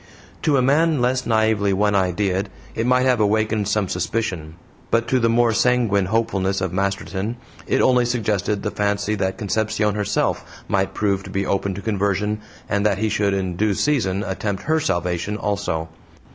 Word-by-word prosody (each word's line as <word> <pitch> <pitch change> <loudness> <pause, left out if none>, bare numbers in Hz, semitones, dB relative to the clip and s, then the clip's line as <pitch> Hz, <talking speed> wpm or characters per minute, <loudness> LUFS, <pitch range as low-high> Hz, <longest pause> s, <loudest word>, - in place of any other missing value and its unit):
To 145 -3 +2
a 130 - +3
man 150 +3 +3
less 125 +1 0
naively 110 -3 +2
one 105 +2 +2
ideaed 95 +1 0 0.3
it 115 +2 -1
might 125 0 +3
have 125 -3 +3
awakened 110 0 +1
some 105 -1 +1
suspicion; 90 -5 -3 0.3
but 115 0 +1
to 130 - +3
the 115 -1 +2
more 115 0 +3
sanguine 110 -6 +2
hopefulness 100 -3 0
of 95 -1 -2
Masterton 100 +2 -2 0.3
it - - +2
only 125 -1 +4
suggested 105 -4 -1
the 105 - -2
fancy 105 +1 0
that 95 -2 -1
Concepcion 105 0 0
herself 105 0 0 0.2
might 95 0 0
prove 100 -2 0
to - - -8
be 95 0 -1
open 100 0 -1
to 100 - -6
conversion, 105 0 0 0.3
and 100 -1 0
that 105 -2 +2
he 110 +2 0
should 100 -2 +1
in 95 -2 -2
due 105 +2 +1
season 105 -10 +1
attempt 100 0 -3
HER 160 +1 +1
salvation 90 - -1
also. 100 -7 -2
105 Hz, 175 wpm, -21 LUFS, 95-115 Hz, 0.3 s, only